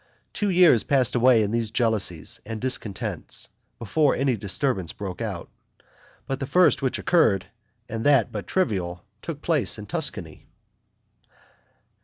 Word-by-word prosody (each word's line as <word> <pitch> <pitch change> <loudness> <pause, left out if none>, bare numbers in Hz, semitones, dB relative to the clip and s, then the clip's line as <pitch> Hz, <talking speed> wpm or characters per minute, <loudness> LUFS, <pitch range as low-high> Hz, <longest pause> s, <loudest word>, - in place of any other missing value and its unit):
Two 205 - -1
years 175 - +5
passed 130 -5 +1
away 120 -2 +4
in 105 - -2
these 115 -1 -1
jealousies 110 -8 0
and 110 -1 -6
discontents 115 -5 -2 0.3
before 140 +6 +1
any 135 -2 +1
disturbance 100 - -2
broke 95 0 -7
out; 100 -7 -4 0.8
but 135 0 -4
the 135 - -4
first 180 -3 +3
which 130 -2 -1
occurred, 105 - +2 0.4
and 115 0 -5
that 140 -7 +3
but 105 -2 -6
trivial, 90 - -2 0.2
took 155 -3 -7
place 155 -9 +1
in 105 - -8
Tuscany. 120 - -4
115 Hz, 135 wpm, -24 LUFS, 100-140 Hz, 0.8 s, years